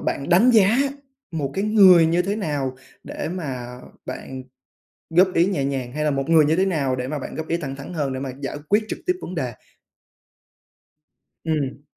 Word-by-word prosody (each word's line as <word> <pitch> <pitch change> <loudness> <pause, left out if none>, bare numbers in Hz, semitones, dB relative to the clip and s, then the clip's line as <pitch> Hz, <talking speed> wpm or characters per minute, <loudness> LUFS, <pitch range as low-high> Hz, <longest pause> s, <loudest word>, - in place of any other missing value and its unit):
bạn 140 - -3
đánh 190 +8 +5
giá 220 -1 +5 0.5
một 150 -5 -3
cái 195 - -1
người 190 -6 +7
như 170 +2 +2
thế 200 +3 -2
nào 145 -9 -2 0.3
để - - -5
mà 130 -8 -5 0.3
bạn 130 -1 -7 0.7
góp 180 +3 +4
ý 170 - +4
nhẹ 185 -8 -1
nhàng 135 -3 -3
hay 150 +3 -3
là 150 - +1
một 135 +1 -2
người 160 -2 +6
như 155 +2 +2
thế 190 - +2
nào 145 -9 0
để 125 0 -4
mà 150 +2 -3
bạn - - -7
góp 160 0 -5
ý 170 - 0
thẳng 140 -5 -5
thắn 140 +5 -9
hơn 145 -5 -2
để 130 - -4
mà 135 -1 -4
giải 140 +1 -4
quyết 210 +2 +3
trực - - -5
tiếp 365 - +3
vấn 185 - -6
đề? 130 -7 -3 1.9
Ừm. 145 -4 -2
155 Hz, 200 wpm, -22 LUFS, 135-180 Hz, 1.9 s, người